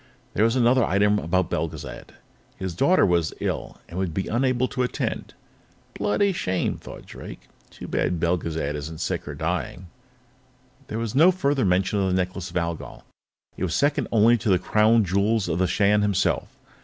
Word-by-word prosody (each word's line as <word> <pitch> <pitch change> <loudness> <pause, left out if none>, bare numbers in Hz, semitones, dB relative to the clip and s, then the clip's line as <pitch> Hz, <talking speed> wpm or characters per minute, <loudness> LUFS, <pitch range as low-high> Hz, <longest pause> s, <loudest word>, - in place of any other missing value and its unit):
There 105 - +3
was 115 +2 +2
another 125 0 +4
item 105 +1 +2
about 95 +1 0
Belgezad; - - -5 0.4
his 95 -2 -4
daughter 155 - +4
was 85 -4 +1
ill - - -3
and 85 +3 -6
would 90 -4 -2
be 95 - -2
unable 130 +1 +1
to 130 - -2
attend. 125 - -3 0.6
Bloody 195 - +1
shame, 95 - -1
thought - - -11
Drake. - - -10 0.3
Too - - -10
bad 90 - -1
Belgezad 85 -3 -1
isn't 80 +2 -6
sick - - -3
or - - -5
dying. 90 0 -3 1.0
There 110 - -4
was 115 -2 -3 0.2
further 140 - +1
mention 95 +2 +1
of 95 - +1
the 90 - +1
Necklace 95 0 -2
of - - -4
Algol; 85 -1 -4 0.5
it - - -5
was 85 -4 -1
second 145 -2 +1
only 115 +1 +5
to 105 - -2
the 95 - +5
Crown 110 +3 +3
Jewels 100 +3 +1
of 85 0 -1
the 95 - +2
Shan 105 +2 +3
himself. 100 -2 +1
100 Hz, 170 wpm, -24 LUFS, 90-115 Hz, 1.0 s, only